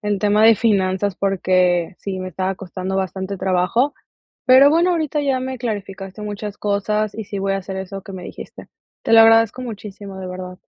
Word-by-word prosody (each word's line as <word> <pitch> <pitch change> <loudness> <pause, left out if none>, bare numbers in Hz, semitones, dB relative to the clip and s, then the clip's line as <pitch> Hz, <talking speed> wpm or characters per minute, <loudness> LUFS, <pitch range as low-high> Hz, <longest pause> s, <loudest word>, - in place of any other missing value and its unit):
el 210 -2 -1
tema 210 +1 +2
de 225 +1 +8
finanzas 200 -2 +1
porque 185 -2 +1
sí 195 -2 -5
me 185 0 -5
estaba 185 +2 -2
costando 190 0 -5
bastante 190 +1 -3
trabajo. 190 +9 +1 0.5
Pero 260 +2 +7
bueno, 335 +4 +3
ahorita 310 -3 -1
ya 270 -2 0
me 260 0 -4
clarificaste 205 -4 -5
muchas 210 0 -6
cosas 210 +1 -1
y 220 - -5
sí 200 0 -6
voy 195 0 0
a - - 0
hacer 190 0 -6
eso 190 +1 -6
que 195 - -11
me 185 -2 -8
dijiste. - - -10 0.4
Te - - +1
lo 225 - +9
agradezco 225 +2 +5
muchísimo 205 -4 -8
de 185 - -6
verdad. 180 0 -7
200 Hz, 190 wpm, -20 LUFS, 190-225 Hz, 0.5 s, lo